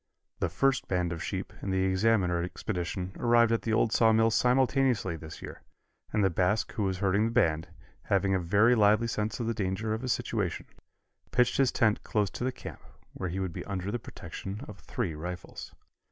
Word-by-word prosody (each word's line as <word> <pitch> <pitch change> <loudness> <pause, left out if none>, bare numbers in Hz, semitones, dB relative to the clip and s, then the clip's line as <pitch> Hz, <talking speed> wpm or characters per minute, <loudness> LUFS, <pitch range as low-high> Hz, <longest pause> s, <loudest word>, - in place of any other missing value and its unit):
The 90 - 0
first 135 +9 +1
band 90 -2 0
of 85 - -6
sheep - - -4
and 95 - -3
the 95 0 +1
Examiner 95 -2 +2
expedition 90 +1 -4
arrived 120 -1 +4
at 115 - +1
the 115 - -1
old 110 - +2
Sawmill 115 0 +4
simultaneously 125 -5 +2
this 80 -1 -10
year, - - -8 0.5
and 105 -1 +1
the 95 - +3
Basque 95 +5 +1
who - - -4
was 95 -2 0
herding 100 +2 +2
the 115 - -1
band, 80 -9 +2 0.4
having 100 0 +2
a 95 - +2
very 100 +7 +4
lively 105 0 +4
sense 110 0 -2
of 120 - -2
the 115 - 0
danger 105 +1 -2
of 110 - -3
his 125 -1 -1
situation, 110 -7 -2 0.6
pitched 125 0 +2
his 135 -2 +3
tent 110 -2 +2
close 105 -3 0
to - - -5
the 130 - 0
camp, - - -9 0.3
where 90 - -4
he 90 +3 -3
would 95 -3 -3
be - - -5
under 100 0 -3
the 120 - -2
protection 100 -1 -8
of - - -10
three 105 -10 -3
rifles. 90 +4 -7
105 Hz, 195 wpm, -29 LUFS, 90-115 Hz, 0.6 s, arrived